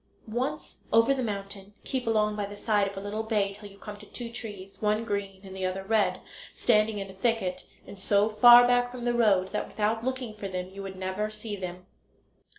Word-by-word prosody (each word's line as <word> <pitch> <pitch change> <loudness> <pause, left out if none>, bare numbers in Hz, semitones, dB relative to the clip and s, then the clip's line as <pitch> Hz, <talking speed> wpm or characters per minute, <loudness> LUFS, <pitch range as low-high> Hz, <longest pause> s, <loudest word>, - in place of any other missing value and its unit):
Once 240 +5 -3
over 230 +4 +5
the 265 - -2
mountain 200 -2 -5
keep 260 -3 -3
along 210 -1 +2
by 205 -1 -2
the 205 - -9
side 205 -1 +1
of 195 0 -7
a - - -2
little 205 +2 -3
bay 210 -3 0
till 205 0 -11
you 200 - -16
come 210 0 -8
to 210 - -13
two 235 -2 -7
trees, 205 -5 -9
one 215 +1 +1
green 200 -3 -3
and 190 -1 -10
the 190 - -5
other 185 +1 -2
red, 215 +1 +1 0.3
standing 215 -2 +3
in 195 -1 -4
a - - -13
thicket, 190 -3 -1 0.2
and 200 - -11
so 200 +2 +3
far 240 +3 +8
back 245 0 +3
from 245 -1 -8
the 240 0 +1
road 200 -5 +3
that 210 - -2
without 220 +2 -1
looking 255 -3 -3
for 205 -2 -6
them 185 -1 -4
you 195 +1 -8
would 195 -1 -6
never 190 +3 -2
see 215 0 -5
them. 180 -1 -7
210 Hz, 220 wpm, -28 LUFS, 195-225 Hz, 0.3 s, far